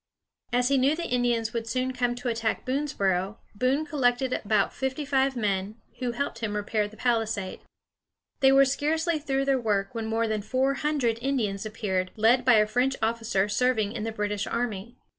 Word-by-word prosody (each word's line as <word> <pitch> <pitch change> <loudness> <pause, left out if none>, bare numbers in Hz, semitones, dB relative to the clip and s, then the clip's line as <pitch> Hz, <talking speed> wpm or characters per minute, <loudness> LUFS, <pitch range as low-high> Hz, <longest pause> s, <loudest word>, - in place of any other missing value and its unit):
] - - -63
As 245 +1 +2
he 275 -1 +3
knew 275 +4 +3
the 340 - -4
Indians 240 -2 0
would 230 -1 -3
soon 255 +2 -1
come 245 -1 0
to 245 +1 -6
attack 230 -1 -1
Boonesboro, 200 -8 -1 0.2
Boone 255 +8 +1
collected 260 -4 +1
about 210 -1 +1
fifty 265 +2 -3
five 270 -1 +1
men, 205 -2 -1 0.2
who 250 -2 -2
helped 280 +4 -3
him 215 -3 -3
repair 210 0 -1
the 215 +1 -15
palisade. 225 -5 -1 0.8
They 265 -1 +5
were 275 0 +6
scarcely 315 +4 0
through 275 -2 -1
their 270 -2 +2
work 200 -2 0
when 225 -2 -3
more 225 +1 0
than 215 -1 -1
four 260 +6 +1
hundred 275 -6 0
Indians 220 -7 -1
appeared, 190 -4 -2
led 230 +4 +4
by 250 -1 +6
a 215 -1 +5
French 250 +5 +1
officer 225 -3 0
serving 220 -1 +1
in 220 -2 -4
the 225 - -2
British 210 -1 -2
army. 235 0 -3
235 Hz, 185 wpm, -27 LUFS, 215-265 Hz, 0.8 s, were